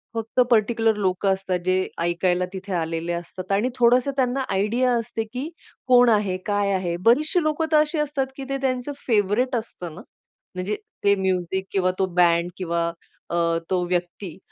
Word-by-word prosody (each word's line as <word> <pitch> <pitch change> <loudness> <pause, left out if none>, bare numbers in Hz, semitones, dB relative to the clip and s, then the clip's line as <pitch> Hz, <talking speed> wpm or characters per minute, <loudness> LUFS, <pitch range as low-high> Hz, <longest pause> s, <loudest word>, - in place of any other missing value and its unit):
फक्त 225 +2 -3
पर्टिक्युलर 225 0 +3
लोकं 190 0 0
असतात, 190 -2 -2
जे 185 0 +1
ऐकायला 175 +1 +1
तिथे 190 0 -6
आलेले 165 0 -2
असतात, 175 +2 -6
आणि 210 +6 +2
थोडंसं 250 +2 +4
त्यांना 260 +1 +1
आयडिया 230 +6 +1
असते, 225 0 -3
की 265 +6 -4 0.4
कोण 245 -1 +6
आहे, 205 -4 +2
काय 205 -1 +1
आहे. 180 -2 -1
बरीचशी 305 +9 +4
लोक 310 +1 0
तर 310 - +5
अशी 305 +1 +1
असतात, 285 -2 -1
की 270 - -5
ते 275 - -1
त्यांचं 255 +1 -1 0.2
फेव्हरेट 225 +3 +2
असतं 180 -7 -7
ना. - - -9 0.5
म्हणजे 185 +3 -2 0.3
ते 200 0 +5
म्युझिक 190 -1 -1
किंवा 185 -2 +1
तो 190 - +3
बँड 175 -1 +4
किंवा 170 -2 -1 0.4
अ, 170 - -2 0.3
तो 185 -1 +1
व्यक्ती, 175 0 -3
200 Hz, 165 wpm, -23 LUFS, 180-245 Hz, 0.5 s, कोण